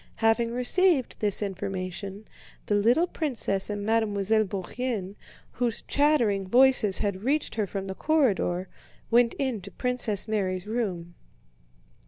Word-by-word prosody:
Having 225 +1 +2
received 275 +3 +2
this 210 0 0
information, 195 +1 -5 0.4
the - - -1
little 235 +11 +3
princess 245 - -1
and 205 -1 -4
Mademoiselle 215 -1 +1
Bourienne, 200 +1 -4 0.4
whose 240 -3 -2
chattering 235 -10 +2
voices 245 -3 +4
had 200 -2 -2
reached 290 +5 0
her 215 -2 -1
from 195 0 -5
the 190 - -4
corridor, 195 - +1 0.4
went 235 0 +4
into 230 -8 -3
Princess 240 -4 -1
Mary's 190 -4 -1
room. 195 -7 -3
215 Hz, 120 wpm, -27 LUFS, 195-245 Hz, 0.4 s, voices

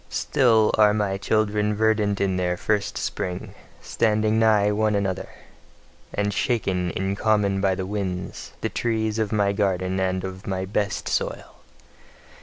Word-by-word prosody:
Still 115 -6 +3
are 105 -1 +6
my 100 -2 -1
children 105 0 +1
verdant 105 -2 +1
in 95 -1 +1
their 90 -1 0
first 105 +2 -1
spring, 90 -1 -4 0.3
standing 110 -1 +1
nigh 105 -2 +4
one 105 0 +1
another, 95 -3 -2 0.8
and 105 0 -1
shaken 95 -6 0
in 95 +3 -2
common 100 -2 +1
by 95 -1 +2
the 95 - -3
winds, 95 -3 -4
the - - -1
trees 110 -2 -1
of 110 -2 -1
my 100 -2 +2
garden 95 -2 0
and 95 -1 -1
of 95 0 -7
my 95 -1 -2
best 100 +1 -2
soil. - - -3
100 Hz, 145 wpm, -24 LUFS, 95-110 Hz, 0.8 s, are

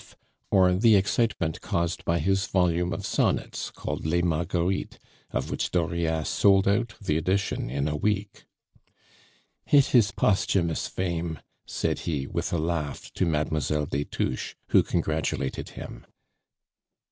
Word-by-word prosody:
_, - - -18 0.4
or 95 -2 +5
the 110 +4 +5
excitement 95 -4 +1
caused 85 0 -1
by 85 - +2
his 95 +5 +1
volume 90 -1 +1
of 80 - -4
sonnets - - 0
called - - -5
Les 85 +2 +1
Marguerites, 85 +2 -1 0.3
of - - -3
which - - -1
Dauriat 80 -2 0
sold 95 -1 +4
out 105 +2 +1
the 75 -7 0
edition 95 -3 -1
in 70 +3 -1
a 75 - -1
week. 100 +4 -2 1.2
"It 140 -1 +4
is 115 -5 +6
posthumous 95 -4 +1
fame," 85 -3 -3 0.3
said - - -1
he, 75 -5 -2
with - - -3
a 85 - +1
laugh, 80 -2 -3
to 90 - 0
Mademoiselle 75 -1 0
des 70 0 -2
Touches, 65 - -3
who - - +6
congratulated 80 -5 -2
him. - - -9
85 Hz, 135 wpm, -26 LUFS, 80-95 Hz, 1.2 s, is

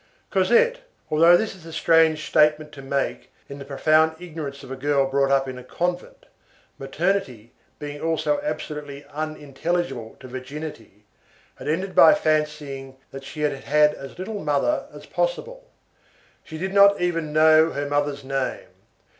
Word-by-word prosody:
Cosette, 485 +1 +3 0.3
although 165 +3 +6
this 220 +2 -2
is 185 -4 -16
a 165 - -10
strange 160 -1 +3
statement 150 0 +3
to 145 - -11
make, 135 0 -3 0.2
in 140 0 -9
the 140 - -8
profound 155 +3 +2
ignorance 155 -5 -7
of 135 - -10
a - - -3
girl 140 +1 +1
brought 135 0 +1
up 135 0 +2
in 130 -1 -6
a - - -11
convent,—maternity 165 - -4 0.3
being 145 0 -7
also 165 - 0
absolutely 150 - -6
unintelligible 150 -4 -3
to 130 - -11
virginity,—had 130 -5 -11
ended 185 +5 -1
by - - +7
fancying 150 - -2 0.2
that 135 0 -9
she 150 +2 -8
had 150 -1 +1
had 150 +2 +2
as 135 0 -10
little 205 +2 -5
mother 150 - 0
as - - -12
possible. - - -3 0.7
She 160 - -9
did 190 +4 -4
not 200 0 +6
even 165 -3 -1
know 155 +1 +5
her 145 +1 -3
mother's 145 -1 -1
name. 135 -1 -3
150 Hz, 145 wpm, -23 LUFS, 140-170 Hz, 0.7 s, by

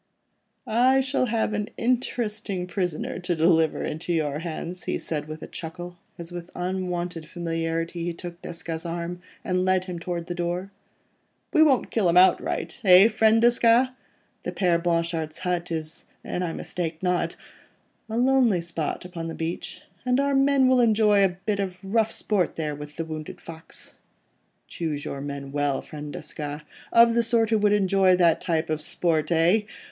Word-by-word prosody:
"I 255 +4 +4
shall 265 -1 +1
have 225 -1 0
an 210 0 -2
interesting 220 -6 -1
prisoner 180 -2 -3
to 180 -1 -1
deliver 160 -1 +3
into 160 +3 -4
your 150 -3 0
hands," 170 +2 -6
he - - -1
said 150 -2 -4
with 155 0 -7
a - - -6
chuckle, 175 +1 -8 0.2
as 170 0 -8
with 175 0 -7
unwonted 180 -2 -3
familiarity 165 0 -2
he 175 - -1
took 170 0 -9
Desgas' 165 -1 -5
arm, 170 +1 -4 0.2
and 180 0 0
led 185 0 +2
him 180 -2 -5
towards 170 0 -4
the 175 - -3
door. 175 +2 -3 0.8
"We 315 - +5
won't 285 -5 +4
kill 205 -6 +2
him 170 - +3
outright, 190 +7 +3
eh, 190 +2 +8
friend 220 0 +4
Desgas? 240 +1 +4 0.5
The - - -4
Père 175 -3 +1
Blanchard's 165 -2 -1
hut 180 -1 -2
is—an 160 +2 -5
I 175 -2 -1
mistake 165 0 -4
not—a 180 +4 -5
lonely 245 -7 +3
spot 170 0 -4
upon 170 -2 -6
the 165 - -5
beach, 165 +2 -5 0.2
and 250 +1 +2
our 280 0 +1
men 275 -1 +4
will 255 -1 +5
enjoy 215 -3 +4
a 180 -2 +1
bit 210 -2 0
of 185 -2 -2
rough 220 +2 +1
sport 200 -5 0
there 155 -2 -2
with 150 +1 -9
the 165 - -3
wounded 155 -1 -7
fox. 165 -1 -10 0.7
Choose 155 -4 -4
your 140 - -5
men 140 -1 -6
well, 145 -1 0
friend 150 -1 -8
Desgas... 150 0 -6 0.3
of 230 0 +6
the 235 - +3
sort 230 -1 +2
who 220 - +4
would 205 0 +3
enjoy 195 -2 +4
that 170 -2 +3
type 160 -2 -1
of 155 -1 -1
sport—eh? 165 +5 +2
175 Hz, 165 wpm, -25 LUFS, 165-210 Hz, 0.8 s, eh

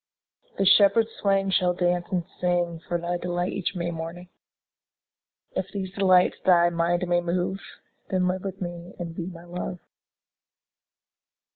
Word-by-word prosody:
20 - - 0
The 190 - +6
shepherd 210 +2 +4
swains 195 -1 +2
shall 180 -1 +3
dance 175 0 0
and 180 -2 0 0.2
sing 175 -2 0
For 175 - 0
thy 175 +1 -2
delight 175 +1 -2
each 195 0 -2
May 170 -1 -2
morning: 165 +2 -7 1.3
If 190 +1 -2
these 190 -2 -4
delights 185 -2 +4
thy 175 -2 +5
mind 175 +1 0
may 175 0 +2
move, 180 +2 -1 0.5
Then 185 -1 +1
live 185 0 -1
with 195 -1 -5
me 175 0 -7
and 170 -2 -5
be 170 0 -5
my 170 -2 -9
Love. 175 +1 -5
180 Hz, 150 wpm, -26 LUFS, 175-185 Hz, 1.3 s, The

